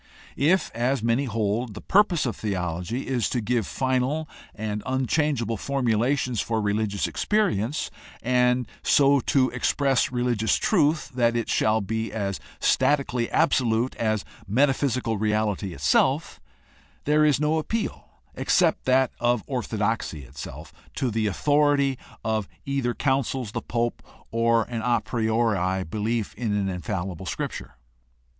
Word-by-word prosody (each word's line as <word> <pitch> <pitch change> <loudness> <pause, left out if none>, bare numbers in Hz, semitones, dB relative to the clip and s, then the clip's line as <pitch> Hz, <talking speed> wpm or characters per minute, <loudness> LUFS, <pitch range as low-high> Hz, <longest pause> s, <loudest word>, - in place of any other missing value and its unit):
If, 175 +7 +2
as 120 +1 0
many 115 +4 +2
hold, 110 -1 -1
the - - -6
purpose^ 190 -6 +3
of 120 - -2
theology 90 +3 -3
is 125 -4 0
to 125 - -1
give 115 -1 0
final 130 +4 0 0.3
and 105 0 -3
unchangeable 130 -3 0
formulations 125 -1 0
for 115 -1 -1
religioits 105 -1 0
experience 155 - 0 0.3
and 125 0 +2
so 140 0 +4
to 130 +1 +2
express 135 +2 +1
religious 120 -3 +1
truth 155 -5 +2
that 120 -2 +1
it 115 -2 -1
shall 110 0 +2
be 110 +2 -3
as 100 -3 -3 0.2
statically 125 -5 +2
absolute 125 -6 +2
as 110 -2 0 0.2
metaphysical 130 -1 +1
reality 105 -2 0
itself, 70 -5 +1 0.6
there 150 +1 +3
is 150 -3 +4
no 155 +1 +2
appeal 225 +8 -3 0.2
except 170 -4 +2
that 130 -1 +3
of 120 -2 +1
orthodoxy 110 - -2
itself 65 +2 -9 0.2
to 130 -4 -1
the 110 0 0
authority 145 +3 +2 0.3
of 110 -3 0 0.2
either 135 -3 -1
councils, 130 -4 0
the - - -3
pope, 120 0 -2 0.3
or 115 0 +3
an 115 -1 -5
a 120 0 +2
priori 110 -5 0
belief 110 +4 -2
in 110 -2 -2
an 100 -1 0
infallible 90 -1 -4
Scrip - - -3
ture. - - -9
120 Hz, 130 wpm, -25 LUFS, 110-135 Hz, 0.6 s, so